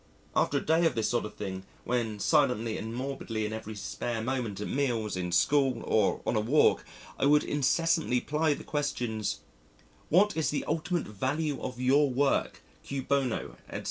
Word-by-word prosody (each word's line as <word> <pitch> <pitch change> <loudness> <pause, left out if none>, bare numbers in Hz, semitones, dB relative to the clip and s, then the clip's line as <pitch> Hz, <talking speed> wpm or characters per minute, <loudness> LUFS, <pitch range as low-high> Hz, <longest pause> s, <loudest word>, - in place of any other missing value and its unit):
After 140 - +2
a - - -3
day 165 +2 +4
of - - -2
this 110 -2 0
sort 120 -2 0
of 105 - -8
thing, 95 -2 -5 0.2
when 115 -4 -1
silently 115 -4 +2
and 110 +1 -5
morbidly 125 -4 -3
in 105 - -3
every 110 -1 -6
spare 115 +3 -3
moment, 115 -4 -2
at 105 - -3
meals, 120 -7 -1
in 90 -1 -3
school, 130 +6 +2
or 105 -3 +2
on - - 0
a - - +3
walk, 130 +8 +3 0.4
I 135 - +3
would 150 +1 +5
incessantly 160 -1 +1
ply 150 +2 +1
the - - -10
questions, 120 -8 -2 0.7
"What 200 +6 +4
is 160 -1 +1
the 150 - -2
ultimate 165 +2 -1
value 140 +7 -2
of 125 -1 -5
your 135 +3 +4
work, 135 +2 0 0.2
cui 140 - -4
bono?" 135 -3 -1
etc. - - -5
130 Hz, 175 wpm, -29 LUFS, 110-145 Hz, 0.7 s, would